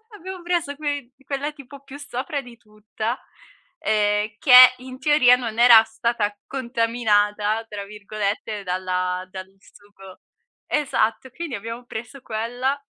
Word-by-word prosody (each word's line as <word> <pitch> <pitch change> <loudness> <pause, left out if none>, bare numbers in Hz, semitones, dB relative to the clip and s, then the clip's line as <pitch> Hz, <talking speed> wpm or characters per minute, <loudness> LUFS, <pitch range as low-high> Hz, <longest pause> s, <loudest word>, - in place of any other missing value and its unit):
abbiamo 375 -1 -9
preso 340 -5 -1
quei 285 -4 -4
quella 285 +2 -3
tipo 280 -1 -13
più 275 +1 -11
sopra 280 0 -4
di 245 -2 -13
tutta, 215 +2 -6 0.6
ehm, 210 -5 +1
che 255 -1 +9
in 255 +1 -11
teoria 295 -5 +5
non 230 -3 -5
era 235 -2 +8
stata 220 -2 -2
"contaminata", 225 -4 0
tra 205 -2 -6
virgolette, 210 0 -4
dalla 185 0 -2
dal 190 0 -8
sugo 195 -2 -17 0.5
esatto, 260 -3 0
quindi 325 -7 -5
abbiamo 230 +4 -7
preso 240 +3 -8
quella, 245 +5 -2
235 Hz, 125 wpm, -23 LUFS, 210-270 Hz, 0.6 s, che